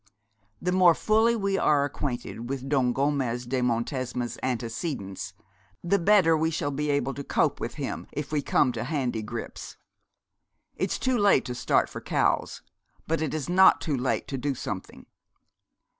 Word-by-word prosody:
'The 180 Hz, -, +1 dB
more 180 Hz, -2 st, +6 dB
fully 220 Hz, +2 st, +3 dB
we 195 Hz, -3 st, 0 dB
are 145 Hz, -2 st, +3 dB
acquainted 125 Hz, -4 st, -5 dB
with 135 Hz, -1 st, -4 dB
Don 135 Hz, -3 st, +2 dB
Gomez 130 Hz, -3 st, 0 dB
de 130 Hz, +1 st, -1 dB
Montesma's 125 Hz, 0 st, -2 dB
antecedents 115 Hz, -, -4 dB, 0.5 s
the 195 Hz, +3 st, +2 dB
better 180 Hz, -3 st, +5 dB
we 160 Hz, +1 st, +1 dB
shall 150 Hz, -3 st, -2 dB
be 150 Hz, +2 st, -2 dB
able 140 Hz, -2 st, 0 dB
to 140 Hz, -, -6 dB
cope -, -, +1 dB
with -, -, -5 dB
him, -, -, -5 dB
if 150 Hz, -1 st, -5 dB
we 150 Hz, -2 st, +1 dB
come 135 Hz, -1 st, +2 dB
to 115 Hz, -1 st, -4 dB
handy 130 Hz, -6 st, -1 dB
grips. 115 Hz, +2 st, -7 dB, 1.0 s
It's -, -, -1 dB
too 255 Hz, -2 st, 0 dB
late 200 Hz, -9 st, +4 dB
to 125 Hz, -, -4 dB
start -, -, +2 dB
for -, -, -8 dB
Cowes, -, -, 0 dB, 0.4 s
but 165 Hz, 0 st, -1 dB
it 155 Hz, -4 st, -1 dB
is 155 Hz, -4 st, -3 dB
not 190 Hz, +2 st, +6 dB
too 150 Hz, -4 st, -1 dB
late 130 Hz, 0 st, -1 dB
to 135 Hz, -, -3 dB
do 140 Hz, +1 st, -1 dB
something. -, -, -6 dB
140 Hz, 165 wpm, -27 LUFS, 125-165 Hz, 1.0 s, more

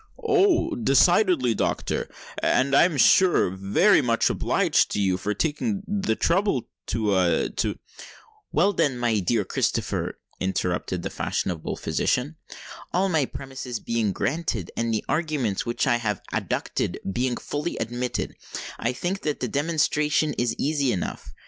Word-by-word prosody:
"Oh! 390 Hz, -6 st, +3 dB
decidedly, 175 Hz, -, +3 dB
doctor:—and 135 Hz, +4 st, -1 dB
I 140 Hz, -, +7 dB
am 170 Hz, -5 st, -1 dB
sure 185 Hz, +7 st, +5 dB
I 90 Hz, -, -1 dB
am 95 Hz, +1 st, -8 dB
very 200 Hz, -, +5 dB
much 115 Hz, -3 st, +2 dB
obliged -, -, +2 dB
to -, -, -1 dB
you 95 Hz, -2 st, +2 dB
for 105 Hz, +3 st, -2 dB
taking 195 Hz, +6 st, -1 dB
the 195 Hz, -, 0 dB
trouble 175 Hz, -, +1 dB, 0.2 s
to—to——" 100 Hz, -5 st, +1 dB, 0.7 s
"Well, 205 Hz, -, +3 dB
then, 140 Hz, -8 st, +1 dB
my 120 Hz, -3 st, +1 dB
dear 105 Hz, +4 st, +1 dB
Sir -, -, -5 dB
Christopher," -, -, -1 dB, 0.2 s
interrupted 90 Hz, -1 st, -2 dB
the -, -, -4 dB
fashionable 85 Hz, -4 st, -2 dB
physician; 145 Hz, +6 st, -1 dB, 0.5 s
"all 190 Hz, +2 st, +1 dB
my 160 Hz, -6 st, +2 dB
premises 130 Hz, -3 st, -6 dB
being 115 Hz, -3 st, -1 dB
granted, 120 Hz, -, -2 dB
and 115 Hz, 0 st, -1 dB
the 110 Hz, -, -1 dB
arguments 145 Hz, -, -1 dB
which 120 Hz, -, 0 dB
I 120 Hz, -, +3 dB
have 105 Hz, -5 st, -3 dB
adduced -, -, -2 dB, 0.2 s
being 125 Hz, +1 st, 0 dB
fully 150 Hz, +4 st, -4 dB
admitted, 120 Hz, +2 st, -3 dB, 0.5 s
I 120 Hz, +2 st, 0 dB
think 185 Hz, +9 st, -3 dB
that 150 Hz, -5 st, -2 dB
the -, -, -1 dB
demonstration 150 Hz, 0 st, +1 dB
is 120 Hz, -2 st, -1 dB
easy 145 Hz, -3 st, +1 dB
enough. 85 Hz, -, -4 dB
130 Hz, 140 wpm, -25 LUFS, 110-165 Hz, 0.7 s, I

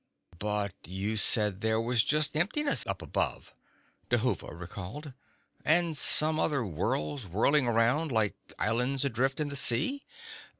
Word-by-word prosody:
"But 105 Hz, -2 st, -3 dB
you 95 Hz, +6 st, -5 dB
said 105 Hz, -2 st, +3 dB
there 110 Hz, 0 st, 0 dB
was 115 Hz, 0 st, +1 dB
just 150 Hz, +1 st, +1 dB
emptiness 280 Hz, -, +2 dB
up -, -, -4 dB
above," -, -, -4 dB, 0.6 s
Dhuva 120 Hz, +1 st, -2 dB
recalled. 100 Hz, -, -10 dB, 0.5 s
"And 165 Hz, +1 st, +4 dB
some 155 Hz, +2 st, +5 dB
other 140 Hz, -6 st, 0 dB
worlds 95 Hz, -, -4 dB
whirling 125 Hz, -, +1 dB
around, 120 Hz, +7 st, +1 dB
like 110 Hz, -3 st, +1 dB, 0.2 s
islands 125 Hz, +5 st, -1 dB
adrift 135 Hz, +2 st, -2 dB
in 150 Hz, -1 st, -2 dB
the 140 Hz, -, -6 dB
sea." 140 Hz, -, +3 dB
120 Hz, 130 wpm, -28 LUFS, 105-150 Hz, 0.6 s, some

